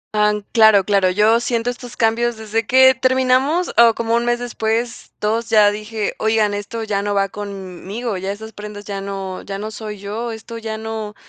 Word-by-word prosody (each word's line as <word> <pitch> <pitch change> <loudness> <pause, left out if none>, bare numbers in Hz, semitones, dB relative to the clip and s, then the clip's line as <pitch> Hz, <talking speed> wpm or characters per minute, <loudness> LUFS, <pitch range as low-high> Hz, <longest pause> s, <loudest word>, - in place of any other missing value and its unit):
Han 210 0 +2
Claro 220 -4 +6
claro, 195 -2 +2
yo 215 +5 +3
siento 240 0 -1
estos 245 0 -11
cambios 230 +1 +1
desde 220 0 -2
que 260 +1 +7
terminamos, 260 +6 +1
o 230 -1 +7
como 230 0 -1
1 235 +1 +1
mes 240 0 +2
después, 235 0 -3
2. 225 +2 -1
Ya 210 -2 +5
dije: 215 0 -4
''Oigan, 220 -1 +2
esto 205 +3 -4
ya 200 -2 -1
no 205 0 -2
va 195 0 +1
con 205 -1 -6
m-m-migo, 195 +4 -6
ya 190 +2 -3
esas 220 +2 -8
prendas 210 0 -9
ya 200 -1 -5
no 195 -1 -5
ya 195 0 -6
no 215 +2 -5
soy 215 -1 -7
yo, 215 +4 -5
esto 225 +1 -8
ya 220 -1 -5
no'', 220 -1 -5
220 Hz, 195 wpm, -19 LUFS, 205-230 Hz, -, que